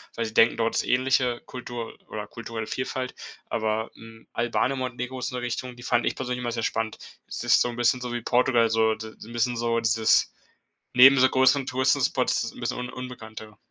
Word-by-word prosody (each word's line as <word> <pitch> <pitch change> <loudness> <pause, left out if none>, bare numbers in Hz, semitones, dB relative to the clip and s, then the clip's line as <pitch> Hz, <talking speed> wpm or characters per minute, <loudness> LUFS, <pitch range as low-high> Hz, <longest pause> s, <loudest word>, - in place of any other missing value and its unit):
weil 115 - -1
sie 110 - -6
denken, 115 +1 +5
dort 115 0 0
ist - - +2
ähnliche 125 -1 +1
Kultur 120 -2 -7
oder 105 -1 -6
kulturelle 115 -1 -6
Vielfalt. 130 0 -3 0.4
Aber, 110 0 -1
hm, 115 0 -14
Albanien 120 +3 0
und 135 - -4
Montenegro 125 0 -4
ist 125 - -3
'ne 125 - -3
Richtung, 125 +1 -4
die 120 - -13
fand 120 -1 +1
ich - - 0
persönlich 125 -1 -3
immer 120 -1 -2
sehr 115 -2 -3
spannend. 110 0 -2 0.3
Es - - -6
ist 120 - +5
so - - +3
'n 120 - -6
bisschen 120 +1 +2
so 125 -1 -4
wie 120 - -3
Portugal, 120 -1 +3
so, 110 0 +2
d 110 +1 -8
das - - -20
ist - - -11
'n 115 - -11
bisschen 120 +1 0
so 115 0 +1
dieses 110 0 +3 0.6
neben 135 +2 +8
so 130 - +7
größeren 130 +1 +3
Touristenspots 130 0 +1
ist 115 - -5
'n - - -11
bisschen 120 - -2
un 125 0 -4
unbekannter. 110 -4 -9
120 Hz, 220 wpm, -26 LUFS, 115-125 Hz, 0.6 s, neben